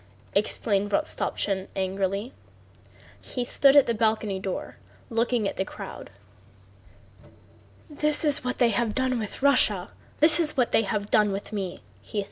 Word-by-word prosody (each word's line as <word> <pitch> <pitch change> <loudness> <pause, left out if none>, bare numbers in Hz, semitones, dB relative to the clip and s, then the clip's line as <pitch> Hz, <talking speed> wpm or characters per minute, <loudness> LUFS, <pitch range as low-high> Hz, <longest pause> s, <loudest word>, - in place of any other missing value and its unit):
exclaimed 205 0 +1
Rostopchín 195 -1 -1
angrily. 195 +4 -2 0.9
He 250 -2 -4
stood 275 +2 +4
by 285 - +10
the 235 - -1
balcony 215 -3 0
door 190 -1 -5 0.3
looking 230 -1 +1
at - - -5
the - - 0
crowd. - - -9 1.8
"This 300 +1 0
is 290 -3 +3
what 250 0 -3
they 240 -2 +4
have 220 0 -1
done 260 -2 0
with 215 +4 -7
Russia! 215 -9 +2 0.3
This 310 +2 +6
is 305 -4 0
what 250 -2 +2
they - - +4
have 205 -1 -3
done 210 -2 +4
with 200 +2 -6
me!" 190 -4 -5
220 Hz, 140 wpm, -26 LUFS, 200-255 Hz, 1.8 s, by